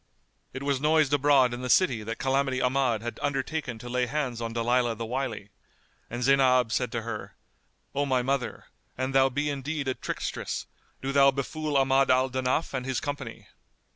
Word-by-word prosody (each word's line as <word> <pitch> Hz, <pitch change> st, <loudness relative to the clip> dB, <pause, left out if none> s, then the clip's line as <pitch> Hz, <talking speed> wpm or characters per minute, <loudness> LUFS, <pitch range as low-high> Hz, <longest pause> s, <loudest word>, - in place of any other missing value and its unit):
It 130 Hz, +1 st, -6 dB
was 140 Hz, -2 st, 0 dB
noised 150 Hz, -2 st, +3 dB
abroad 140 Hz, -3 st, +4 dB
in 120 Hz, -, -5 dB
the 125 Hz, -, -4 dB
city 125 Hz, -8 st, +3 dB
that 115 Hz, +2 st, -5 dB
Calamity 135 Hz, -1 st, 0 dB
Ahmad 125 Hz, -4 st, +1 dB
had 120 Hz, -, -5 dB
undertaken 135 Hz, -2 st, -2 dB
to 120 Hz, -, -10 dB
lay 125 Hz, 0 st, 0 dB
hands 130 Hz, -3 st, -2 dB
on 115 Hz, -1 st, -3 dB
Dalilah 120 Hz, 0 st, +1 dB
the 115 Hz, -, -4 dB
Wily, 115 Hz, -4 st, -3 dB, 0.6 s
and 120 Hz, +1 st, -4 dB
Zaynab 130 Hz, -3 st, +4 dB
said 120 Hz, +2 st, 0 dB
to 115 Hz, -2 st, -2 dB
her, 110 Hz, -2 st, -6 dB, 0.6 s
"O 140 Hz, +1 st, 0 dB
my 130 Hz, -2 st, +1 dB
mother, 135 Hz, 0 st, -2 dB, 0.3 s
an 130 Hz, +1 st, -1 dB
thou 135 Hz, 0 st, +4 dB
be 145 Hz, +3 st, -1 dB
indeed 140 Hz, +1 st, -3 dB
a 130 Hz, -, +1 dB
trickstress, -, -, -4 dB, 0.4 s
do 135 Hz, -, -1 dB
thou 140 Hz, 0 st, +6 dB
befool 145 Hz, +2 st, -2 dB
Ahmad 135 Hz, 0 st, +3 dB
al 130 Hz, 0 st, +3 dB
Danaf 130 Hz, +4 st, -1 dB
and 130 Hz, -2 st, -2 dB
his 130 Hz, -1 st, -1 dB
company." 140 Hz, -5 st, -6 dB
130 Hz, 180 wpm, -27 LUFS, 125-140 Hz, 0.6 s, thou